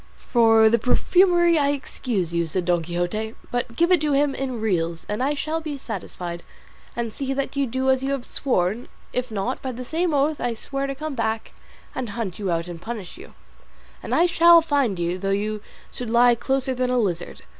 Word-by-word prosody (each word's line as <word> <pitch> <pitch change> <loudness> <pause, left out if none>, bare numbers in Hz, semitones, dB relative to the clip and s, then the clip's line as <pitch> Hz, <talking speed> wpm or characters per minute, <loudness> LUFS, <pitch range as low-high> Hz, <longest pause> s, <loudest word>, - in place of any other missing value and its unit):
"For 225 -2 +4
the 235 +2 +3
perfumery 345 - +4
I 285 -1 +2
excuse 235 - -2
you," 170 -1 0
said 175 +2 -2
Don 175 -1 +2
Quixote; 175 +7 -3 0.4
"give 340 +5 +2
it 355 -4 +5
to 300 -2 +1
him 280 0 +2
in 260 -4 -3
reals, 170 -6 -1
and 210 +3 -3
I 285 +3 +1
shall 315 +3 -2
be 305 -3 -5
satisfied; 180 -7 -6 0.5
and 235 -2 -3
see 270 -1 -3
that 275 0 -3
you 280 -1 +1
do 260 +3 -2
as 260 -1 +1
you 270 - -2
have 265 -3 -3
sworn; 220 -3 -1 0.3
if 250 0 -2
not, 220 +4 -3
by 260 - -3
the 250 +1 -7
same 335 +5 0
oath 295 +1 +1
I 240 -1 -1
swear 275 +4 -3
to 275 - -4
come 310 +1 -5
back 225 -2 -2 0.4
and 250 -3 -4
hunt 205 -6 -4
you 200 -3 -2
out 170 0 -1
and 170 -1 -8
punish 215 -4 -6
you; - - -13 0.7
and - - -2
I 345 - +5
shall 340 -1 +7
find 280 - +1
you 175 +1 -2
though 195 +1 -2
you 210 +2 -1 0.3
should 245 -2 -6
lie 240 +1 +5
closer 265 +2 0
than 255 0 -1
a 250 - +1
lizard. 175 -7 -2
245 Hz, 205 wpm, -23 LUFS, 200-275 Hz, 0.7 s, shall